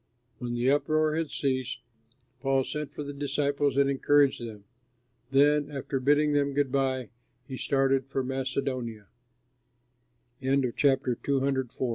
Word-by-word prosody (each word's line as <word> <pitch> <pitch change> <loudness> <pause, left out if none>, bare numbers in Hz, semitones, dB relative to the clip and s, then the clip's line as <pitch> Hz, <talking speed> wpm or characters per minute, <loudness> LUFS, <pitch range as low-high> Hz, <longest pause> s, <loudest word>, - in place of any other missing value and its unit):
When 120 -1 -3
the 120 +3 +2
uproar 155 +1 +2
had 160 -2 -1
ceased, 130 -3 -2 0.6
Paul 135 0 +2
sent 150 +1 -5
for 150 - -6
the 145 0 -6
disciples 140 0 0
and 140 0 +4
encouraged 140 0 +3
them. 110 -3 -8 0.7
Then, 145 +2 +3
after 135 -1 -3
bidding 145 +3 +3
them 140 -1 +1
good 140 -2 +1
by, 130 -3 0 0.4
he 130 - -6
started 135 -1 +1
for 135 -1 -2
Macedonia. 130 -4 -3 1.3
PAUL 130 - -2
WRITES 135 +1 +3
TO - - +2
THE - - -4
CHRISTIANS 135 -1 0
AT - - -13
R 130 - +1
135 Hz, 150 wpm, -28 LUFS, 130-145 Hz, 1.3 s, and